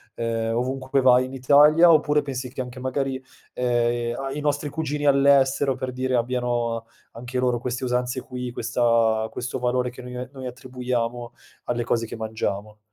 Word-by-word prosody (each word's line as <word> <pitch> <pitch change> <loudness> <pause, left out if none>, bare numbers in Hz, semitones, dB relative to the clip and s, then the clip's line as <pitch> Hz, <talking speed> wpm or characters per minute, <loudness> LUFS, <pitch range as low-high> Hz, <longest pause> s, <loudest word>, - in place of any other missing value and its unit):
ehm, 115 -1 -1
ovunque 130 +2 -2
poi 135 - +3
vai 130 0 +5
in 130 - -9
Italia, 150 +6 +6
oppure 150 -1 +3
pensi 130 -2 -5
che 130 - -10
anche 125 0 -7
magari, 130 0 -2 0.3
ehm, 120 -1 0
a 135 0 -4
i 150 - -4
nostri 145 0 0
cugini 150 -1 -3
all'estero 140 -1 +4
per 130 0 -4
dire 130 0 -1
abbiano 120 -1 -1 0.3
anche 125 +2 -5
loro 125 -1 +1
queste 125 +1 -4
usanze 125 +1 -1
qui, 125 -1 -6
questa 115 -2 +1
questo 125 +1 -4
valore 125 0 0
che 125 - -11
noi 125 0 -7
noi 130 -1 -8
attribuiamo 125 -1 -4 0.3
alle 120 -1 -1
cose 115 -1 0
che - - -7
mangiamo? 110 -1 -4
125 Hz, 165 wpm, -24 LUFS, 120-135 Hz, 0.3 s, Italia